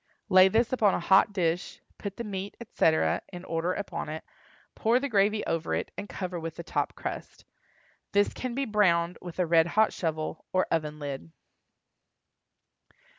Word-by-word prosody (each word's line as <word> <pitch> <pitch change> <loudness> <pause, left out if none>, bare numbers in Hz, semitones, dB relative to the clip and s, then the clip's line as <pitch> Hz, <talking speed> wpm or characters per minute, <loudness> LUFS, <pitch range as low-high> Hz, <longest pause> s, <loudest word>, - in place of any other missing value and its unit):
Lay 185 -1 +8
this 230 +5 +2
upon 215 -6 +3
a - - -1
hot 190 +3 +5
dish, 175 -2 -1 0.2
put 200 -2 -6
the 235 - -3
meat, 200 -2 -5
etc., 165 -8 +2
in 180 -1 -8
order 165 +2 -1
upon 200 -5 -4
it, 155 +1 -5 0.5
pour 230 +3 +2
the 280 - -2
gravy 210 -2 +2
over 165 0 -1
it, - - -3
and 205 - -6
cover 180 -2 -4
with 165 -1 -5
the 170 - -7
top - - -2
crust. - - -7 0.7
This 205 0 +3
can 255 -2 -4
be 275 +1 0
browned 180 -6 +2
with 175 -2 -8
a 180 - +2
red 165 0 +4
hot 220 0 +5
shovel, 155 -2 -3
or 185 - +2
oven 150 -2 -1
lid. 145 +1 -6
185 Hz, 170 wpm, -28 LUFS, 165-205 Hz, 0.7 s, Lay